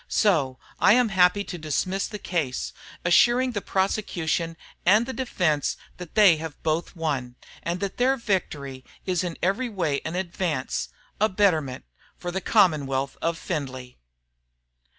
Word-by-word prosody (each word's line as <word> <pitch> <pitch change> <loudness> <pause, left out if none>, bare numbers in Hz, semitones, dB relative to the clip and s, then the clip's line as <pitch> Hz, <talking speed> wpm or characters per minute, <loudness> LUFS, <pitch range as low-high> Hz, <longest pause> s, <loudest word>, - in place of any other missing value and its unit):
"So, 150 - +2 0.2
I 200 - +6
am 245 -1 +4
happy 190 +1 +4
to 180 -3 -7
dismiss 185 +5 -1
the 210 - -6
case, 130 - -2 0.3
assuring 240 +8 +5
the 205 -4 -3
prosecution 175 -5 -1 0.3
and 210 +6 +5
the 260 - -5
defence 175 - 0 0.2
that 180 -3 -10
they 200 -7 +7 0.3
both 160 +2 0
have - - -18
won, 140 -7 -2 0.3
and 175 +2 -2
that 200 -1 -3
their 260 +2 +3
victory 145 - -2 0.2
is 185 -2 0
in 175 -2 -4
every 210 +8 +1
way 165 -9 -1
an 160 - -4
advance, 175 -6 -2 0.3
a 215 +2 +3
betterment, 160 - +1 0.3
for 175 - -5
the 190 +2 -2
commonwealth 140 -11 +2
of 165 0 0
Findlay." 130 -7 -5
175 Hz, 145 wpm, -25 LUFS, 150-200 Hz, 0.3 s, they